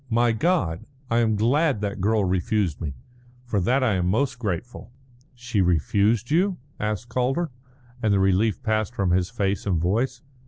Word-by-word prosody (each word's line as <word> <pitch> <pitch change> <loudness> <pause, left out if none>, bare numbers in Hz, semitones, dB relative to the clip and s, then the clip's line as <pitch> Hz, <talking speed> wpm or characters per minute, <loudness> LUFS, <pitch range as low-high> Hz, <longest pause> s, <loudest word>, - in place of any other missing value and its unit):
My 120 0 +3
God, 115 - 0 0.2
I 115 - +3
am 110 -2 +2
glad 130 +3 +2
that 100 -2 -3
girl 105 0 +2
refused 95 -2 0
me. 70 -4 -4 0.5
For 105 -5 0
that 130 +9 +2
I 115 -5 +2
am 90 -2 0
most 125 +7 0
grateful." 110 +3 -4 0.4
"She 120 -4 -1
refused 100 - +1
you?" 180 +4 +2 0.2
asked 105 +2 -2
Calder, 135 +7 -1 0.5
and 110 -3 +2
the 100 - +3
relief 95 +3 +2
passed 110 -2 -1
from 95 -3 0
his 90 0 +2
face 100 -4 -2
and 90 -4 +1
voice. 120 - -1
110 Hz, 165 wpm, -24 LUFS, 95-120 Hz, 0.5 s, My